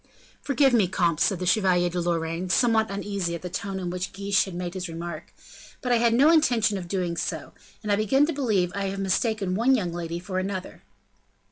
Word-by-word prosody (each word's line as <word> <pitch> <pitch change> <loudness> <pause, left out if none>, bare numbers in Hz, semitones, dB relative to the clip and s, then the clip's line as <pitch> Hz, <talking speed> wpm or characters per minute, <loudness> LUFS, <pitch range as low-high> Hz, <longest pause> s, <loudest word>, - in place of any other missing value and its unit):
"Forgive 275 -2 +2
me, 215 -6 +4
comte," 170 -3 0
said 195 - +2
the 180 - -4
Chevalier 180 -2 +3
de 175 0 -2
Lorraine, 170 +1 -2
somewhat 220 +1 +3
uneasy 200 -3 -3
at 170 - -9
the 180 - -6
tone 195 +1 -4
in 180 -2 -4
which 180 +1 -4
Guiche 200 +1 +1
had 190 -3 -8
made 175 0 -4
his 185 -1 -4
remark, 165 -1 -7 0.5
"but 250 - -3
I 240 - +5
had 230 0 +3
no 285 +6 +6
intention 240 -10 +3
of 175 - -8
doing 180 -2 -2
so, - - -4 0.3
and 210 - -2
I - - +4
begin 240 +7 +3
to 330 - -2
believe 215 -11 0
that 200 - -3
I 200 - -1
have 195 0 -3
mistaken 195 0 0
one 240 +7 +3
young 180 -8 -2
lady 170 -1 -4
for 185 +1 -4
another." 190 0 -5
190 Hz, 220 wpm, -25 LUFS, 175-220 Hz, 0.5 s, no